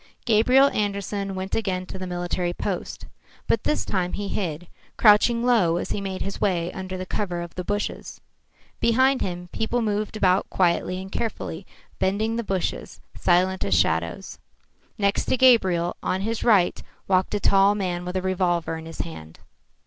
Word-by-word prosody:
Gabriel 250 Hz, +5 st, +5 dB
Andersen 200 Hz, -1 st, -2 dB
went 190 Hz, +1 st, -5 dB
again 185 Hz, -4 st, -1 dB
to 190 Hz, -, -8 dB
the 185 Hz, -, -5 dB
military 175 Hz, 0 st, -2 dB
post. -, -, -4 dB, 0.4 s
But 225 Hz, -, 0 dB
this 300 Hz, -, 0 dB
time 180 Hz, -2 st, -1 dB
he 205 Hz, -1 st, -3 dB
hid, 175 Hz, -5 st, -3 dB, 0.3 s
crouching 230 Hz, +2 st, +5 dB
low 195 Hz, -9 st, +3 dB
as -, -, -4 dB
he 205 Hz, -, -2 dB
made 190 Hz, -1 st, -4 dB
his 195 Hz, -, -6 dB
way 175 Hz, -4 st, 0 dB
under 185 Hz, 0 st, -5 dB
the 185 Hz, -, -5 dB
cover 185 Hz, -3 st, -3 dB
of 170 Hz, 0 st, -7 dB
the 180 Hz, -, -5 dB
bushes. 205 Hz, +3 st, -4 dB, 0.6 s
Behind 260 Hz, +3 st, +3 dB
him 180 Hz, -1 st, -4 dB
people 230 Hz, +2 st, -1 dB
moved 210 Hz, 0 st, -2 dB
about 190 Hz, -2 st, +2 dB
quietly 180 Hz, 0 st, +1 dB
and 190 Hz, 0 st, -8 dB
carefully, 200 Hz, -6 st, -4 dB, 0.3 s
bending 215 Hz, +4 st, 0 dB
the 235 Hz, -, -2 dB
bushes, 190 Hz, -4 st, -3 dB, 0.2 s
silent 185 Hz, +1 st, +2 dB
as 100 Hz, -, +1 dB
shadows. 80 Hz, +1 st, 0 dB, 0.6 s
Next 200 Hz, -1 st, +1 dB
to 260 Hz, -, +1 dB
Gabriel, 190 Hz, -9 st, +4 dB
on 185 Hz, -, -1 dB
his 225 Hz, +2 st, -2 dB
right, 200 Hz, -7 st, +3 dB, 0.3 s
walked 190 Hz, +1 st, +1 dB
a -, -, 0 dB
tall 200 Hz, +1 st, +4 dB
man 180 Hz, -3 st, -2 dB
with 180 Hz, +1 st, -5 dB
a 185 Hz, -, -2 dB
revolver 175 Hz, -3 st, 0 dB
in 160 Hz, -, -10 dB
his 165 Hz, -, -5 dB
hand. 80 Hz, -1 st, -9 dB
190 Hz, 170 wpm, -24 LUFS, 180-210 Hz, 0.6 s, Gabriel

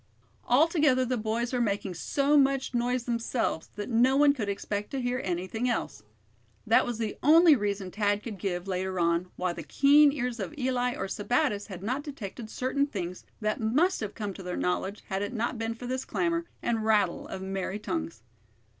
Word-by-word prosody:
Altogether 290 Hz, -1 st, +4 dB
the 255 Hz, +1 st, 0 dB
boys 230 Hz, +2 st, -2 dB
were 250 Hz, -, +1 dB
making 200 Hz, -4 st, -1 dB
so 280 Hz, -, +1 dB
much 275 Hz, -2 st, +3 dB
noise 245 Hz, +1 st, 0 dB
themselves 235 Hz, -7 st, -2 dB
that 205 Hz, -, -4 dB
no 250 Hz, +3 st, +3 dB
one 290 Hz, 0 st, +6 dB
could 220 Hz, -7 st, -3 dB
expect 205 Hz, +1 st, -3 dB
to 275 Hz, -, -3 dB
hear 250 Hz, +1 st, -1 dB
anything 185 Hz, +7 st, -2 dB
else. 220 Hz, -, -2 dB, 0.6 s
That 225 Hz, +2 st, +4 dB
was 240 Hz, -2 st, -3 dB
the 220 Hz, -2 st, -3 dB
only 320 Hz, +2 st, +7 dB
reason 200 Hz, -4 st, -2 dB
Thad 205 Hz, 0 st, 0 dB
could 210 Hz, -4 st, -7 dB
give, 180 Hz, -1 st, -3 dB
later 185 Hz, 0 st, -2 dB
on, 170 Hz, +1 st, +1 dB
why 180 Hz, -1 st, -1 dB
the -, -, -7 dB
keen 290 Hz, +1 st, +5 dB
ears 250 Hz, -4 st, -3 dB
of 315 Hz, -, -5 dB
Eli 250 Hz, -2 st, 0 dB
or 195 Hz, -, -3 dB
Sebattis 210 Hz, +1 st, 0 dB
had 190 Hz, -3 st, -8 dB
not 255 Hz, +7 st, -1 dB
detected 235 Hz, -6 st, -7 dB
certain 270 Hz, +4 st, 0 dB
things 185 Hz, -8 st, -5 dB, 0.2 s
that 215 Hz, 0 st, -1 dB
must 300 Hz, +13 st, +2 dB
have 210 Hz, -2 st, -5 dB
come 205 Hz, -3 st, -4 dB
to 195 Hz, -, -9 dB
their 180 Hz, -1 st, -4 dB
knowledge 190 Hz, +3 st, -2 dB
had 190 Hz, 0 st, -1 dB
it 205 Hz, +3 st, -3 dB
not 235 Hz, 0 st, -2 dB
been 225 Hz, 0 st, -2 dB
for 245 Hz, -, -9 dB
this 255 Hz, +1 st, -2 dB
clamor, 335 Hz, -1 st, -1 dB, 0.2 s
and 225 Hz, -2 st, 0 dB
rattle 210 Hz, -5 st, +2 dB
of 190 Hz, -, -6 dB
merry 190 Hz, +1 st, -3 dB
tongues. 105 Hz, -, -4 dB
225 Hz, 190 wpm, -28 LUFS, 195-260 Hz, 0.6 s, only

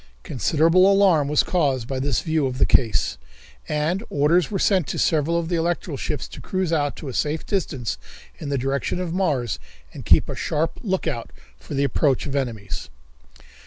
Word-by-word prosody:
Considerable 165 Hz, -, +3 dB
alarm 190 Hz, -7 st, +4 dB
was 150 Hz, 0 st, +3 dB
caused 140 Hz, -9 st, 0 dB
by 135 Hz, 0 st, -3 dB
this 135 Hz, -2 st, 0 dB
view 160 Hz, -3 st, 0 dB
of 130 Hz, -1 st, -4 dB
the -, -, +4 dB
case, 115 Hz, -, +2 dB, 0.5 s
and 155 Hz, +5 st, 0 dB
orders 150 Hz, +4 st, +2 dB
were 200 Hz, -, -2 dB
sent 185 Hz, -6 st, +2 dB
to -, -, -3 dB
several 160 Hz, +1 st, +2 dB
of 170 Hz, -1 st, -1 dB
the 175 Hz, -, -1 dB
electrical 170 Hz, -1 st, -1 dB
ships 145 Hz, +2 st, -3 dB
to -, -, -10 dB
cruise 185 Hz, -3 st, -1 dB
out 145 Hz, -3 st, 0 dB
to 155 Hz, -, -8 dB
a 130 Hz, -, -5 dB
safe 150 Hz, +4 st, -1 dB
distance 140 Hz, -, -2 dB, 0.4 s
in 145 Hz, -, -5 dB
the 140 Hz, -, 0 dB
direction 135 Hz, +6 st, -1 dB
of 175 Hz, -2 st, -3 dB
Mars 145 Hz, -, 0 dB, 0.3 s
and -, -, -8 dB
keep -, -, +4 dB
a -, -, -4 dB
sharp 160 Hz, +2 st, -1 dB
outlook 175 Hz, -, -3 dB, 0.3 s
for -, -, -7 dB
the 140 Hz, -, +1 dB
approach 140 Hz, 0 st, +1 dB
of 140 Hz, -, -4 dB
enemies. 115 Hz, -8 st, -3 dB
150 Hz, 185 wpm, -23 LUFS, 135-170 Hz, 0.5 s, alarm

